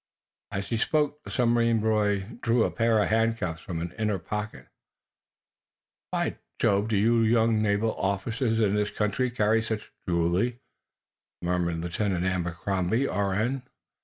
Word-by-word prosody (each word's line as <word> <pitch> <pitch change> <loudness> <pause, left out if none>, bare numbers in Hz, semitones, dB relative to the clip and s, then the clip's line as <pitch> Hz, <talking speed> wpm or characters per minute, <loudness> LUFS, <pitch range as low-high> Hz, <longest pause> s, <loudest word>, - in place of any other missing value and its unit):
As 95 +1 -4
he 115 - 0
spoke, 150 +4 +1
the - - -9
submarine 115 -2 +2
boy 105 -2 +2 0.2
drew 115 0 +3
a - - 0
pair 115 -2 +2
of - - -1
handcuffs 110 -7 0
from 85 -4 -5
an 85 +1 -4
inner 105 -2 +1
pocket. 105 +4 -5 1.4
"By - - -1 0.2
Jove, 100 +1 +2
do 115 +1 +3
naval 110 0 +1 0.2
youngsters 115 +2 -1
in 105 -3 +3
this 105 0 +1
country 105 +5 0
carry 110 -1 +2
such 110 -1 -4 0.2
jewelry?" 90 +9 +1 0.8
murmured 85 -1 0
Lieutenant 90 +1 -1
Abercrombie, 90 +6 0
R.N. 105 +7 0
105 Hz, 130 wpm, -27 LUFS, 95-115 Hz, 1.4 s, drew